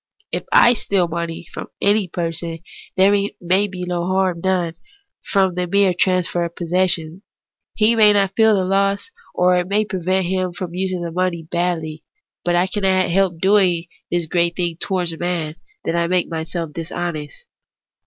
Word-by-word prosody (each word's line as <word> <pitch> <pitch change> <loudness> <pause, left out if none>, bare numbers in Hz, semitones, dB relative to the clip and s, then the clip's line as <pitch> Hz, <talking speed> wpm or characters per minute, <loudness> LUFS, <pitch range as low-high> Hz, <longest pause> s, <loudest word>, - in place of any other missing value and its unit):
If - - -3
I 240 - +7
steal 195 -5 0
money 170 0 -4
from - - -6
any 205 -1 +2
person, 165 -1 -4 0.4
there 190 +1 +5 0.3
may 185 +4 +2
be 185 -2 -7
no 175 -1 -2
harm 185 -2 0
done 180 -3 0 0.6
by 195 -2 +4
the 180 0 -2
mere 200 0 +3
transfer 180 -1 +1
of 170 0 -5
possession; 175 -1 -1 0.5
he 220 +2 +4
may 215 -2 +7
not 200 -2 +1
feel 220 -1 +5
the 190 -2 +1
loss, 195 - 0 0.2
or 180 0 +3
it 180 - -3
may 210 +2 +1
prevent 185 -1 -1
him 185 0 -1
from 175 -1 -6
using 185 -1 -2
the 170 - -4
money 175 -1 -1
badly. 165 -2 -2 0.4
But 175 0 +1
I 175 +1 +3
cannot 190 -2 +1
help 185 -2 +2
doing 190 -3 +3 0.2
this 175 -1 0
great 170 +1 +1
wrong 170 -3 -1
towards 180 -4 -2
Man, 170 -3 -2 0.3
that 165 - -1
I 170 0 +1
make 180 0 +1
myself 165 -1 -4
dishonest. 165 - -5
180 Hz, 165 wpm, -20 LUFS, 170-190 Hz, 0.6 s, I